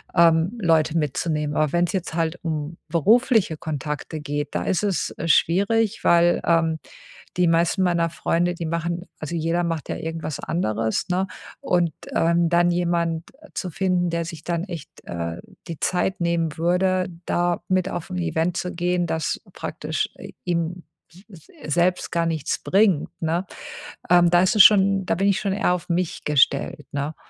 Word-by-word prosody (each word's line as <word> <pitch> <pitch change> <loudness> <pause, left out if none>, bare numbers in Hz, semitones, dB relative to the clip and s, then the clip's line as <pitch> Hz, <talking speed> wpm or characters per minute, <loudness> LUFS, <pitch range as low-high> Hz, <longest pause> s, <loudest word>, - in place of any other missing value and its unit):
ähm, 170 +5 +4
Leute 165 -2 +2
mitzunehmen. 150 0 -1
Aber 155 0 +1
wenn's 175 0 +2
jetzt 185 -3 -3
halt 165 +1 -1
um 155 0 -3
berufliche 210 - +3
Kontakte 150 0 -5
geht, 145 0 -4
da - - 0
ist 185 - 0
es, 195 -6 0
äh, 165 - -3
schwierig, 200 +7 +2
weil, 175 0 +4
ähm, 165 -2 +2 0.6
die 180 - +3
meisten 170 +3 +2
meiner 170 -2 +2
Freunde, 175 +1 0
die 170 - -5
machen 170 +2 -2
also 155 +1 -5
jeder 165 +2 0
macht 165 -3 -3
ja - - -2
irgendwas 160 -2 -5
anderes, 110 - -1
ne? 185 +2 0 0.3
Und, 175 -4 +1 0.2
ähm, 170 0 +3
dann 175 0 +3
jemand 170 -1 -1 0.2
zu 185 - -4
finden, 180 0 0
der 170 0 -2
sich 165 -2 -8
dann 170 0 -2
echt, 165 -6 -7 0.2
äh, 85 -1 -4 0.3
die 165 - -6
Zeit 185 +1 0
nehmen 170 -2 0
würde, 180 +2 +1 0.2
da 175 0 0
mit 185 0 +2
auf 175 - -5
'n 180 - -4
Event 165 0 -1
zu 180 -1 -3
gehen, 175 0 0
das 160 -2 -2
praktisch - - -3
i - - -10
ihm 175 0 -2 0.3
s 185 +4 -16
s 160 -4 -8
selbst 180 +1 +1
gar 170 -1 +1
nichts 160 -3 -1
bringt, 195 -6 +2
ne? 170 +3 0 0.6
Ähm, 175 -1 +6
da 175 0 +5
ist 185 - +2
es 205 - +9
schon 195 -2 +5
da - - +1
bin 195 +3 +1
ich 190 - +2
schon 195 -1 -1
eher 195 -3 +1
auf 180 - -5
mich 175 0 -1
gestellt, 145 0 +2
ne? 145 +2 -3
170 Hz, 170 wpm, -23 LUFS, 160-180 Hz, 0.6 s, es